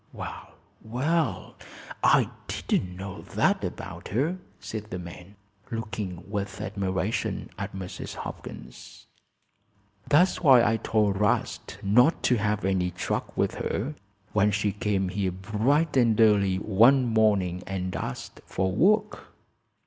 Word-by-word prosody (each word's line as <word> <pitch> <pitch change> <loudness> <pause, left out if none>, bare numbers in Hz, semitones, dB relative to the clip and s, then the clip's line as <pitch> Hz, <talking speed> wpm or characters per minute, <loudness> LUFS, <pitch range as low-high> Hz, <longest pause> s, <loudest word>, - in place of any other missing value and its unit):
"Well, - - -8 0.3
well! 125 - -1 0.5
I - - +4 0.2
didn't 90 -1 -1
know 95 +1 -7
that - - +1
about - - -6
her," 150 - 0 0.2
said 110 0 -6
the 90 - -4
man, 90 +2 -10 0.3
looking 105 -5 -4
with 100 -1 -4
admiration 95 +1 -2
at 100 0 -5
Mrs. 95 -1 -6
Hopkins. - - -9 1.0
"That's 175 +6 +4
why 130 -7 +7
I 115 +1 +2
told 105 -3 +1
'Rast 105 - 0
not 125 - +4
to 125 - +3
have 105 -1 0
any 95 -2 +1
truck 90 - -3
with - - +1
her, 130 +9 -2 0.4
when 105 0 +4
she 105 0 0
came 100 -2 -1
here 95 0 -1
bright 110 - 0
and 115 -4 +3
early 100 -4 +4
one 115 +7 +4
morning 105 -6 +2
and 95 -1 -3
asked 65 - -5
for 95 0 -1
work." 210 - +1
105 Hz, 125 wpm, -27 LUFS, 95-115 Hz, 1.0 s, why